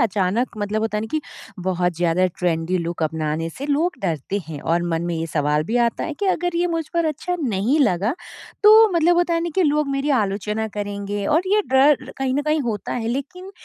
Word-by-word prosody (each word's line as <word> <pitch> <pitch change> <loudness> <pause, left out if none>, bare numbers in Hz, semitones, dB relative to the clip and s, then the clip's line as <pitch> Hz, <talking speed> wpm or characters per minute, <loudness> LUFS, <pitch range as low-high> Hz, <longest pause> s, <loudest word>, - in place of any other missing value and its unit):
अचानक 215 +2 0
मतलब 205 +1 -1
होता 220 -1 -1
है - - 0
ना 220 - -4
कि 310 - 0 0.4
बहुत 180 -1 0
ज़्यादा 175 +1 +2
ट्रेंडी 175 0 0
लुक 170 -1 -3
अपनाने 155 +1 -1
से 275 - -7
लोग 305 +5 +1
डरते 170 +2 -2
हैं 150 -3 -6
और 170 +1 0
मन 165 0 -1
में 175 - -2
ये 165 0 -2
सवाल 150 -1 0
भी 225 +8 -1
आता 235 - -3
है 315 - -4
कि 405 - 0
अगर 355 -2 0
ये 350 - +2
मुझ 330 -2 -2
पर 335 - +2
अच्छा 320 +4 -2
नहीं 235 +3 +1
लगा, 210 0 +2 0.5
तो 435 +1 +8
मतलब 345 +1 +3
होता 345 -1 +2
है 335 - +1
ना 340 0 -2
कि 375 - +3
लोग 300 -1 +1
मेरी 275 +1 -1
आलोचना 210 -2 0
करेंगे 205 0 -4
और 320 +3 +3
ये 420 +2 +3
डर 265 0 +4
कहीं 265 -1 0
न 290 - 0
कहीं 305 +1 +1
होता 220 -6 -3
है 230 -2 -2
लेकिन 360 +10 -5
225 Hz, 220 wpm, -22 LUFS, -, 0.5 s, तो